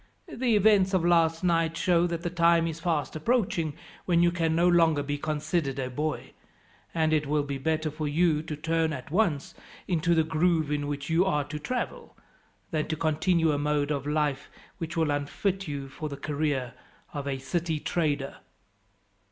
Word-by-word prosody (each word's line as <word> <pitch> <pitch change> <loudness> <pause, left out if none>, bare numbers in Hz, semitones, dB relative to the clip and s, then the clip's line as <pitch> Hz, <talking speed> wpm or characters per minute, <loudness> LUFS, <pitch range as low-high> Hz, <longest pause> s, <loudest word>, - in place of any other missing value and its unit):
The 240 -2 +1
events 200 -2 +4
of 175 -2 +1
last 165 -1 +3
night 165 -2 +1
show 175 -1 +3
that 170 -1 -4
the 175 - -2
time 170 -1 +4
is 165 -1 -4
fast 165 -3 -1
approaching 165 - 0 0.3
when 170 -1 +3
you 175 - +4
can 165 -2 0
no 170 +2 +4
longer 165 -4 +4
be 145 0 -3
considered 150 -1 -1
a 130 -1 -3
boy, 150 +4 -3 0.6
and 160 -1 +1
it 150 -2 +1
will 150 0 +1
be 140 -1 -4
better 155 +1 -1
for 155 0 -3
you 155 0 +2
to 155 -1 -5
turn 160 +1 0
at 135 +1 -7
once 175 -7 +1 0.3
into 170 -1 +2
the 160 - +4
groove 160 -1 +1
in 145 -1 -1
which 145 +1 -4
you 165 +3 +4
are 150 -7 +1
to 150 +1 -6
travel, 250 +10 -4 0.5
than 155 -2 -1
to 160 - -1
continue 160 +1 +2
a 145 - 0
mode 145 0 0
of 140 -1 -2
life 150 -2 -1 0.3
which 170 0 -5
will 160 -2 +2
unfit 180 +7 -2
you 140 -2 -4
for 150 +3 -6
the 140 - -6
career 145 -5 -2 0.4
of 140 -1 -4
a 135 -1 -1
city 160 +3 -2
trader." 145 -4 -1
160 Hz, 185 wpm, -27 LUFS, 145-170 Hz, 0.6 s, events